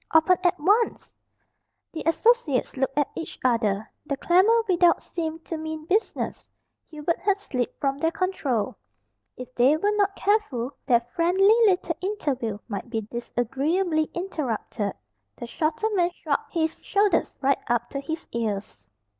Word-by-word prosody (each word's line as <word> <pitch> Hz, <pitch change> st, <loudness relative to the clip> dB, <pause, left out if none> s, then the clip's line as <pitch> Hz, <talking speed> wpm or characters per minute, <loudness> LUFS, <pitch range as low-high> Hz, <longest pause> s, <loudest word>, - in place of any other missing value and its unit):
Open 320 Hz, +3 st, +6 dB
at 360 Hz, -1 st, +2 dB
once!" 415 Hz, +9 st, +1 dB, 0.8 s
The 320 Hz, -, -4 dB
associates 335 Hz, -, +2 dB
looked 270 Hz, +1 st, -1 dB
at 290 Hz, -, +1 dB
each 330 Hz, -, -6 dB
other. 220 Hz, -4 st, +1 dB, 0.2 s
The 280 Hz, -, -2 dB
clamour 400 Hz, +10 st, +4 dB
without 350 Hz, -2 st, +4 dB
seemed 325 Hz, -1 st, -5 dB
to 330 Hz, -, -4 dB
mean 315 Hz, 0 st, -5 dB
business. 405 Hz, +6 st, -1 dB, 0.4 s
Hubert 310 Hz, +1 st, -2 dB
had 400 Hz, 0 st, +1 dB
slipped 255 Hz, -, -4 dB
from 275 Hz, 0 st, -1 dB
their 325 Hz, -, +2 dB
control. 325 Hz, -, -1 dB, 0.6 s
If 255 Hz, 0 st, -9 dB
they 260 Hz, +6 st, +4 dB
were 415 Hz, +5 st, +1 dB
not 400 Hz, -1 st, +2 dB
careful 385 Hz, -, 0 dB, 0.2 s
their 240 Hz, -3 st, +5 dB
friendly 375 Hz, +5 st, +4 dB
little 360 Hz, -4 st, +1 dB
interview 275 Hz, -, -2 dB
might 205 Hz, +1 st, -5 dB
be 225 Hz, -2 st, -2 dB
disagreeably 295 Hz, -, 0 dB
interrupted. 250 Hz, -, -3 dB, 0.4 s
The -, -, -7 dB
shorter 310 Hz, -, -1 dB
man 350 Hz, -3 st, +3 dB
shrugged 310 Hz, -5 st, -3 dB
his 320 Hz, -1 st, -1 dB
shoulders 405 Hz, 0 st, +1 dB
right 275 Hz, 0 st, +2 dB
up 240 Hz, 0 st, 0 dB
to 275 Hz, -, -3 dB
his 315 Hz, +3 st, -5 dB
ears. 205 Hz, -, -4 dB
315 Hz, 145 wpm, -25 LUFS, 250-370 Hz, 0.8 s, Open